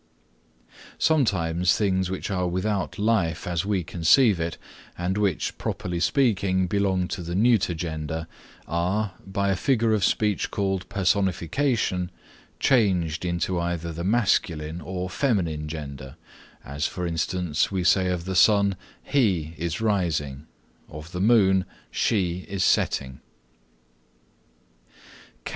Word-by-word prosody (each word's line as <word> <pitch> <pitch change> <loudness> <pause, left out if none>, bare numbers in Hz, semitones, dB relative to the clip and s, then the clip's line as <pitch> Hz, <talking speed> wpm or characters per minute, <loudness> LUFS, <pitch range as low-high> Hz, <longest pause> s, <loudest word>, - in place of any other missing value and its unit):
Sometimes 90 - +2
things 95 -3 +1
which 95 +2 -4
are 90 -2 0
without 95 +2 -2
life 100 -7 0
as 90 +2 -2
we 100 -4 0
conceive 90 - +4
it 80 0 -3 0.4
and 90 +2 -1
which, 100 -4 -1
properly 90 -1 -3
speaking, 95 -1 +2
belong 95 -1 0
to - - -4
the 85 +1 -4
neuter 105 -4 +3
gender, 80 -1 -4 0.4
are, 90 +5 -1
by 100 +1 -1
a - - +1
figure 115 +2 +2
of 105 -3 +1
speech 105 +1 +1
called 95 -3 -2
Personification, 100 - 0 0.5
changed 90 - +2
into 85 +1 -1
either 85 -1 -3
the 85 +2 -5
masculine 85 -6 0
or 90 +3 -4
feminine 90 - -1
gender, 70 -4 -7 0.5
as, 70 +2 -2
for 90 - -5
instance, 85 -1 -1
we 95 -2 -1
say 90 +2 +3
of 90 -2 -2
the 95 - -3
sun, 100 +1 +4 0.3
He 95 - +1
is 85 +3 -3
rising; 80 -9 -1 0.4
of 75 +3 -10
the 90 - -4
moon, 95 -4 +4 0.3
She 90 -5 0
is 95 -1 -1
setting. 65 -6 +1
90 Hz, 120 wpm, -25 LUFS, 85-100 Hz, 0.5 s, conceive